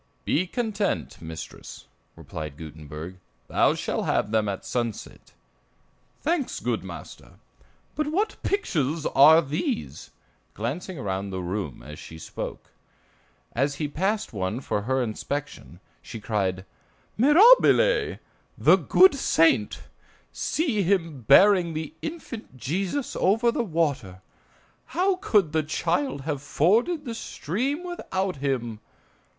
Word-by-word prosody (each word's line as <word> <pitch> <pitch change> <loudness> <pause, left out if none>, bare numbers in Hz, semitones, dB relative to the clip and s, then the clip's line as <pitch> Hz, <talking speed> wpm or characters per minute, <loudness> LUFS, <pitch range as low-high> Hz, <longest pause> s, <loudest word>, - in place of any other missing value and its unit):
"Be 180 +4 +1
content, 215 -1 -2
mistress," 80 -1 -9 0.3
replied 75 -3 -7
Gutenberg; 80 +2 -9 0.3
"thou - - +3
shall - - -2
have 105 - 0
them 110 -2 +1
at 95 - -5
sunset." 120 -4 -4 0.9
"Thanks, 315 -4 -1
good - - -2
master; - - -10 0.6
but 305 -1 -2
what 405 +8 -1
pictures 160 - -1
are 160 +4 +7
these?" 130 - -3 0.5
glancing 155 - -4
around 100 -4 -3
the 95 -1 -4
room 90 - -4
as 75 0 -10
she 80 - -10
spoke. 80 - -7 0.8
As 140 +4 0
he 150 +1 -2
passed 195 - -1
one 95 +3 -2
for 105 -5 -2
her 130 +4 0
inspection, 120 - -5 0.2
she 115 - -8
cried: 95 -3 -2 0.5
"Mirabile! 465 - +5 0.4
the - - +6
good 375 -2 +5
saint! 165 - +2 0.5
See 275 -9 -1
him 165 -7 0
bearing 180 +1 +6
the 155 -1 -4
infant 280 - -7
Jesus 190 - -2
over 225 +5 +3
the 240 - -1
water. 145 - -2 0.7
How 375 +1 +3
could 200 - +2
the 160 0 +2
child 165 - -1
have 145 -1 -3
forded 220 - +1
the 235 - -4
stream 250 - -3
without 195 - -3
him? 125 -5 -2
155 Hz, 120 wpm, -25 LUFS, -, 0.9 s, are